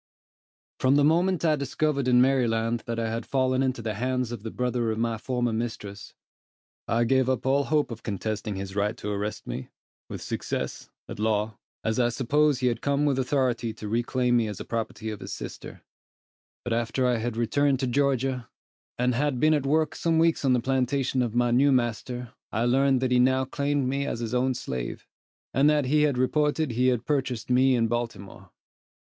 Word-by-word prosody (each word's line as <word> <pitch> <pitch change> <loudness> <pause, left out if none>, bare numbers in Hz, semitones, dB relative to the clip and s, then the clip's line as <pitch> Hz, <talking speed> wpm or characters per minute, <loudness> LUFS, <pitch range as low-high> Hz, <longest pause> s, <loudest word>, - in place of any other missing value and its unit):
From 130 +1 +3
the 145 - +4
moment 170 +4 +2
I 155 -1 +4
discovered 140 0 -1
in 125 -1 +5
Maryland, 120 -3 +2
that 115 -1 -2
I 115 -1 -1
had 115 +1 -3
fallen 130 -1 +1
into 130 -3 -1
the 110 -1 -2
hands 125 +2 -1
of 120 -4 -5
the 110 - -5
brother 125 -1 -1
of 110 - -2
my 115 -1 -1
former 120 -1 -1
mistress, 110 -3 -5 0.7
I 115 +1 +2
gave 130 +2 +2
up 130 - -1
all 140 +1 +2
hope 150 -4 +1
of 115 - -7
contesting 105 0 -3
his 95 0 -6
right 105 +3 0
to 105 - -4
arrest 105 +1 -3
me, 65 - -6 0.4
with - - -6
success, - - -4 0.2
at - - -8
law, 105 0 0 0.2
as 110 +2 0
I 120 -1 +3
supposed 135 +4 +1
he - - +1
had 120 -2 0
come 140 +1 +1
with 140 -2 +1
authority 125 -4 0
to 110 -1 -8
reclaim 120 +2 +1
me 115 -2 +1
as 105 -2 -5
the - - -7
property 110 -1 -4
of 105 - -7
his - - -7
sister; - - -8 0.8
but 120 - -2
after 120 +3 0
I 125 -1 +2
had 115 0 -3
returned 135 +4 +2
to - - +1
Georgia, 130 -1 0 0.5
and 125 +1 +1
had 135 0 0
been 155 +3 +4
at 145 -3 0
work 155 +1 +2
some 165 -1 0
weeks 165 -1 +2
on 135 -2 +3
the 125 - +3
plantation 130 +1 0
of 120 -2 -2
my 120 0 +2
new 135 +4 +4
master, 120 0 -1 0.2
I 115 - 0
learned 135 +1 +3
that 130 -1 0
he 125 - +4
now 130 +1 +3
claimed 140 0 -1
me 140 +2 -1
as - - -3
his 115 0 -4
own 130 +1 +1
slave, 65 - -5 0.5
and 140 +3 +4
that 150 -2 +2
he 150 +3 +3
had 145 -4 +2
reported 150 +3 +1
he 125 +2 +1
had 125 -2 +1
purchased 130 -5 -1
me 130 +1 +4
in 115 -1 +2
Baltimore. 115 -4 -5
125 Hz, 200 wpm, -26 LUFS, 115-135 Hz, 0.8 s, in